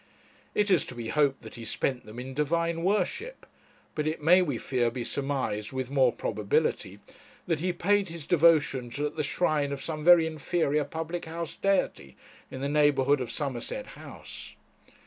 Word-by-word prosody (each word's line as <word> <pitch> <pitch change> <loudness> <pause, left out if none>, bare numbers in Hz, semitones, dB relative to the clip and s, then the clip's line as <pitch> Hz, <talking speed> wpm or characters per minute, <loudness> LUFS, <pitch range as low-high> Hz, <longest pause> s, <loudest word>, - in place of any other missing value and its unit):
It 210 -1 +2
is 180 -6 +4
to 125 - -8
be 115 -1 -5
hoped 140 -4 +1
that 110 - -10
he 115 - -8
spent 125 +1 -2
them 110 +2 -10
in 130 +2 -6
divine 165 +3 0
worship; 210 - -1 0.5
but 150 0 -2
it 155 - -1
may, 175 +5 +6
we 145 -9 -1
fear, 120 -1 0
be 120 +1 -4
surmised 125 -6 -2
with 130 -1 -4
more 130 -3 +4
probability, 105 -2 -1 0.5
that 165 -3 0
he 180 +3 0
paid 195 +2 +1
his 165 -2 -7
devotions 145 -7 +3
at 150 +1 -2
the 155 - -1
shrine 150 -1 0
of 140 -1 -5
some 155 -2 -4
very 175 -1 +7
inferior 155 -1 0
public 165 +3 -5
house 165 0 -5
deity 190 - -1 0.3
in 130 - -7
the 140 - -1
neighbourhood 145 -2 +3
of 125 - -4
Somerset 125 -1 -4
House. - - -10
145 Hz, 170 wpm, -28 LUFS, 130-170 Hz, 0.5 s, very